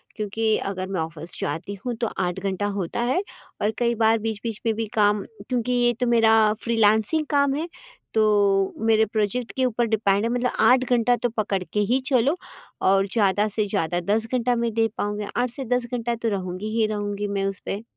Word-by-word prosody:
क्योंकि 215 Hz, +1 st, 0 dB
अगर 185 Hz, -1 st, -4 dB
मैं 190 Hz, -3 st, -3 dB
ऑफिस 165 Hz, +1 st, -5 dB
जाती 165 Hz, +7 st, -3 dB
हूँ, 245 Hz, -2 st, -2 dB
तो 230 Hz, 0 st, -1 dB
8 180 Hz, -1 st, -2 dB
घंटा 195 Hz, +1 st, -2 dB
होता 185 Hz, +5 st, -2 dB
है 260 Hz, +10 st, +1 dB, 0.4 s
और 210 Hz, +1 st, +2 dB
कई 235 Hz, -1 st, +1 dB
बार 225 Hz, 0 st, +3 dB
बीच-बीच 220 Hz, 0 st, -4 dB
में 225 Hz, -, +2 dB
भी 225 Hz, +1 st, -2 dB
काम 205 Hz, -1 st, +3 dB, 0.3 s
क्योंकि 250 Hz, -1 st, -1 dB
ये 240 Hz, 0 st, +3 dB
तो 250 Hz, -, +1 dB
मेरा 225 Hz, -2 st, +4 dB, 0.3 s
फ्रीलांसिंग 225 Hz, +6 st, +2 dB
काम 280 Hz, -2 st, +3 dB
है, 320 Hz, +3 st, -2 dB, 0.5 s
तो 205 Hz, -3 st, +3 dB
मेरे 220 Hz, -1 st, +4 dB
प्रोजेक्ट 220 Hz, +3 st, -2 dB
के 260 Hz, -1 st, +1 dB
ऊपर 240 Hz, -1 st, +1 dB
डिपेंड 205 Hz, -2 st, +1 dB
है। 230 Hz, -, 0 dB
मतलब 245 Hz, 0 st, 0 dB
8 255 Hz, 0 st, +5 dB
घंटा 245 Hz, 0 st, +3 dB
तो 245 Hz, 0 st, -1 dB
पकड़ 195 Hz, -3 st, 0 dB
के 195 Hz, +5 st, -3 dB
ही 265 Hz, -, +3 dB
चलो 270 Hz, +6 st, +2 dB, 0.4 s
और 195 Hz, +1 st, +3 dB
ज़्यादा 205 Hz, -1 st, +2 dB
से 210 Hz, 0 st, -1 dB
ज़्यादा 175 Hz, -3 st, -1 dB
10 225 Hz, +1 st, 0 dB
घंटा 245 Hz, 0 st, +2 dB
मैं 235 Hz, -1 st, -1 dB
दे 225 Hz, 0 st, +2 dB
पाऊँगी, 205 Hz, 0 st, -2 dB
8 245 Hz, 0 st, +1 dB
से 265 Hz, +2 st, -5 dB
10 245 Hz, -1 st, -1 dB
घंटा 235 Hz, 0 st, -1 dB
तो 230 Hz, 0 st, -2 dB
रहूँगी 185 Hz, 0 st, -4 dB
ही 220 Hz, -, +4 dB
रहूँगी 205 Hz, -1 st, -3 dB
मैं 200 Hz, -1 st, -1 dB
उस 195 Hz, 0 st, -3 dB
पे। 205 Hz, +3 st, -4 dB
220 Hz, 200 wpm, -24 LUFS, 200-240 Hz, 0.5 s, 8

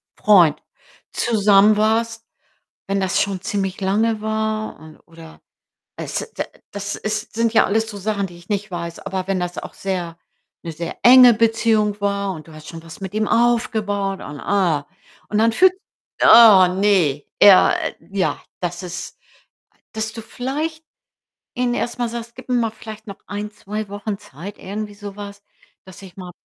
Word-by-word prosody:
Freund 175 Hz, -8 st, +4 dB, 0.5 s
zusammen 210 Hz, -2 st, +4 dB
warst. 225 Hz, +1 st, 0 dB, 0.6 s
Wenn 195 Hz, 0 st, 0 dB
das 190 Hz, -2 st, 0 dB
schon 195 Hz, -2 st, -2 dB
ziemlich 195 Hz, 0 st, -3 dB
lange 215 Hz, +3 st, +1 dB
war 220 Hz, 0 st, -2 dB
und 155 Hz, 0 st, -14 dB
oder 165 Hz, -1 st, -14 dB, 0.6 s
es 465 Hz, -, -4 dB
da -, -, -1 dB, 0.3 s
das 200 Hz, 0 st, -4 dB
ist 215 Hz, +1 st, -4 dB
sind 230 Hz, 0 st, +1 dB
ja -, -, +6 dB
alles 220 Hz, +2 st, 0 dB
so 205 Hz, -, -9 dB
Sachen, 200 Hz, 0 st, -2 dB
die 175 Hz, -1 st, -14 dB
ich 175 Hz, -, -18 dB
nicht 205 Hz, 0 st, -2 dB
weiß, 170 Hz, -1 st, -6 dB
aber 190 Hz, -1 st, -4 dB
wenn 195 Hz, -1 st, -1 dB
das 180 Hz, 0 st, -4 dB
auch -, -, -8 dB
sehr 180 Hz, -4 st, -4 dB, 0.5 s
'ne 165 Hz, -, -5 dB
sehr 165 Hz, +1 st, -6 dB
enge 250 Hz, -1 st, +8 dB
Beziehung 220 Hz, -2 st, +1 dB
war 200 Hz, -1 st, -1 dB
und 155 Hz, -2 st, -11 dB
du -, -, -13 dB
hast 155 Hz, 0 st, -12 dB
schon 165 Hz, -1 st, -9 dB
was 165 Hz, +3 st, -12 dB
mit 190 Hz, -1 st, -6 dB
ihm 215 Hz, 0 st, 0 dB
aufgebaut 215 Hz, -5 st, 0 dB
und, 145 Hz, -, -8 dB
ah 175 Hz, -8 st, 0 dB, 0.4 s
und 210 Hz, -, -1 dB
dann 225 Hz, +1 st, +4 dB
fühlt 370 Hz, +11 st, +5 dB, 0.5 s
oh 210 Hz, -6 st, +8 dB
ne, 180 Hz, -7 st, +1 dB, 0.2 s
er, 195 Hz, -2 st, +7 dB
äh -, -, -4 dB, 0.2 s
ja, 195 Hz, -2 st, -1 dB, 0.2 s
das 175 Hz, 0 st, -4 dB
ist 175 Hz, +1 st, -7 dB, 0.5 s
a -, -, -35 dB, 0.2 s
dass 220 Hz, 0 st, -3 dB
du 225 Hz, 0 st, -8 dB
vielleicht 305 Hz, +8 st, -4 dB, 0.7 s
ihnen 245 Hz, -1 st, 0 dB
erst 240 Hz, 0 st, -3 dB
mal 240 Hz, -1 st, -1 dB
sagst: 235 Hz, 0 st, -7 dB
„Gib 255 Hz, -, -12 dB
mir 250 Hz, -, 0 dB
mal 230 Hz, -2 st, +1 dB
vielleicht 220 Hz, 0 st, -11 dB
noch 200 Hz, -, -8 dB
1, 205 Hz, +1 st, -5 dB
2 210 Hz, 0 st, -6 dB
Wochen 205 Hz, +1 st, -5 dB
Zeit“, 185 Hz, +3 st, -11 dB
irgendwie 205 Hz, +2 st, -6 dB
so 205 Hz, -1 st, -9 dB
was, 200 Hz, 0 st, -9 dB, 0.4 s
„dass 190 Hz, 0 st, -14 dB
ich 190 Hz, -2 st, -13 dB
mal 180 Hz, -2 st, -8 dB
205 Hz, 175 wpm, -20 LUFS, 185-220 Hz, 0.7 s, enge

